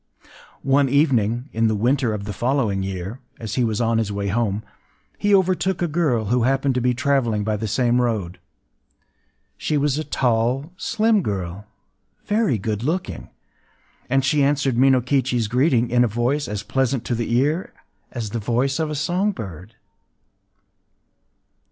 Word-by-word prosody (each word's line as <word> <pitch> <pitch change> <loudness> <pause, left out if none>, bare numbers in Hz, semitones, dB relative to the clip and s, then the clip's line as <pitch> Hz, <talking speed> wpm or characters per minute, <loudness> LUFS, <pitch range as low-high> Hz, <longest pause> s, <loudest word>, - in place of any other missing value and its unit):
One 135 0 +3
evening, 125 -4 +2
in 115 0 +2
the 110 - +1
winter 125 +3 +1
of 105 -2 -4
the 100 0 -5
following 120 -4 0
year, 95 +4 -5 0.2
as 110 -2 -5
he 125 - +1
was 110 -2 0
on 115 -1 +2
his 110 -2 -1
way 100 0 -2
home, 110 -1 -1 0.6
he 205 - +1
overtook 185 -1 +1
a - - +1
girl 145 -9 0
who 125 - +3
happened 135 +2 +1
to 125 - 0
be 125 0 +1
traveling 130 -5 +1
by 110 +1 0
the 110 +1 -3
same 120 +3 +2
road. 100 -7 -2 1.2
She 150 - -1
was 145 0 +1
a - - -2
tall, 130 +2 0
slim 220 +2 +1
girl, 100 - -4 0.6
very 210 - +1
good 105 +1 -3
looking; 165 +8 -3 0.8
and 135 +1 +2
she 145 +2 +2
answered 140 -2 +1
Minokichi’s 130 -2 +2
greeting 125 0 +2
in 120 0 +4
a - - +3
voice 120 +7 -1
as 105 -1 -4
pleasant 130 +2 -1
to - - -1
the 115 0 -1
ear 150 +8 0 0.4
as 115 -4 -5
the 115 - -2
voice 125 +6 0
of 160 -1 0
a 150 - -3
song 180 +8 0
bird. 100 - -9
125 Hz, 160 wpm, -22 LUFS, 110-140 Hz, 1.2 s, in